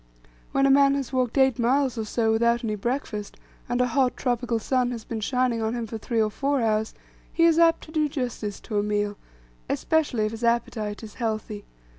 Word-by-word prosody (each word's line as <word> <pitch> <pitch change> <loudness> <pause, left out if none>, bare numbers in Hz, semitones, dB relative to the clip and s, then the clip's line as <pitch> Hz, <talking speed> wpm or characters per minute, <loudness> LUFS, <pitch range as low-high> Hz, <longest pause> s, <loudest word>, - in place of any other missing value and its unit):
When 275 0 +2
a 275 - +5
man 275 0 +5
has 275 -1 -4
walked 255 0 0
eight 265 -3 +4
miles 260 +2 +2
or 225 -2 -3
so 225 +1 +1
without 235 +1 +2
any 215 -2 -1
breakfast, 210 -1 -3 0.3
and 245 - 0
a 250 - +4
hot 250 0 +1
tropical 245 -2 0
sun 250 +2 0
has 235 -3 -5
been 225 0 -5
shining 250 +1 0
on 220 +2 -1
him 235 -1 -3
for 225 0 -6
three 230 +1 -2
or 215 -1 +2
four 280 +4 0
hours, 220 -1 0 0.4
he 335 - +1
is 335 -1 +5
apt 330 -1 +4
to 315 - -12
do 310 -2 +1
justice 245 -7 -4
to 210 -3 -2
a - - +2
meal, 205 0 -1 0.5
especially 290 -9 +1
if 215 - -2
his 225 +1 -7
appetite 225 -2 -1
is 215 - -9
healthy. 215 -2 -3
235 Hz, 210 wpm, -25 LUFS, 220-265 Hz, 0.5 s, a